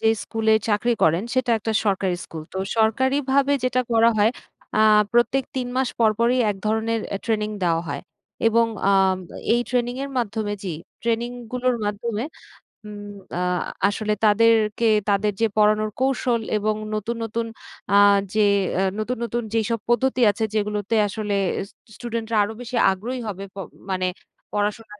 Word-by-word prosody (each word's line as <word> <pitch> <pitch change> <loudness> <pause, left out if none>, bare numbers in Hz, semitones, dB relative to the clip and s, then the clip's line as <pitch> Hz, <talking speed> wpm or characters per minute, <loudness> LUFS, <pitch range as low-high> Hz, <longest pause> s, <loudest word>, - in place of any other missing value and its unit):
যে 220 - +3
স্কুলে 220 -1 0 0.2
চাকরি 215 +3 +2
করেন 165 +4 +3
সেটা 255 -2 +1
একটা 220 +1 -2
সরকারি 195 -3 +1
স্কুল। 160 -1 -8
তো 190 - -4 0.2
সরকারিভাবে 265 +5 +2
যেটা 255 0 +2
করা 230 0 +5
হয় 210 +2 +5 0.5
আ - - +2 0.3
প্রত্যেক 240 +3 +2
৩ 250 -1 -1
মাস 260 -1 +1
পর 225 -2 +5
পরই 240 +2 +3
এক 200 - -4
ধরনের 220 +1 0
অ্যা 200 - -2
ট্রেনিং 215 -2 0
দেওয়া 165 -2 +1
হয়। 140 0 -3 0.5
এবং 230 +1 +3 0.2
আ - - +5 0.6
এই 240 - +2
ট্রেনিংয়ের 250 +3 -1
মাধ্যমে 215 -2 -2
জি, 180 -4 -3 0.3
ট্রেনিংগুলোর 240 +1 -1
মাধ্যমে 210 +2 -2 0.6
উম 205 -1 -8 0.3
আ - - -1 0.5
আসলে 210 +1 -1
তাদেরকে 220 +1 +3 0.2
তাদের 205 +1 +2
যে - - +5
পড়ানোর 215 0 +3
কৌশল 255 -3 +1 0.2
এবং 215 +1 0 0.2
নতুন, 215 +3 -3
নতুন 225 +1 -2 0.5
আ - - +4 0.4
যে 215 - +2 0.3
অ্যা 190 - +1 0.2
নতুন, 245 +4 -2
নতুন 235 +1 -2
যেসব 230 0 0
পদ্ধতি 255 +1 +2
আছে 215 +3 -4
যেগুলোতে 210 +1 -1
আসলে 210 0 -3 0.4
স - - -22 0.2
স্টুডেন্টরা 230 -1 -4
আরও 210 +2 -4
বেশি 245 +1 -6 0.2
আগ্রহী 230 +7 -4
হবে 195 -2 -5
প - - -19 0.3
মানে 185 -1 0 0.5
পড়াশোনার 210 +1 -2
225 Hz, 150 wpm, -23 LUFS, 210-240 Hz, 0.6 s, করা